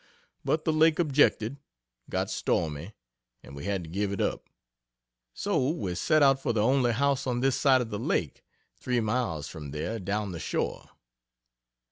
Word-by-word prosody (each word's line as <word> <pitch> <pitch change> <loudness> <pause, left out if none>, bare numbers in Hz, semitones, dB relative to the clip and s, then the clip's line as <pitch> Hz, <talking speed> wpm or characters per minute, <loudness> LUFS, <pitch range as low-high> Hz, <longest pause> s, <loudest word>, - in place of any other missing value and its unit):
But 155 0 0
the 160 - +2
Lake 155 0 +4
objected 140 -6 +2 0.5
got - - -1
stormy, 80 +5 -1 0.5
and 70 - -11
we 70 - -7
had 100 -3 -1
to 80 - -10
give 100 +2 -1
it 100 - -3
up. - - -2 0.9
So 130 - 0
we 105 - -2
set 150 - +3
out 135 -1 +4
for - - 0
the 105 -2 +1
only 130 0 +3
house 140 +2 +1
on 120 -1 0
this 135 -1 +2
side 130 -3 +4
of 115 - -5
the 105 - -3
Lake - - -1 0.4
three 125 -1 0
miles 105 - -1
from 75 -3 -8
there, 75 +11 -3
down 100 +1 -2
the 85 - -6
shore. - - -3
115 Hz, 170 wpm, -28 LUFS, 95-135 Hz, 0.9 s, Lake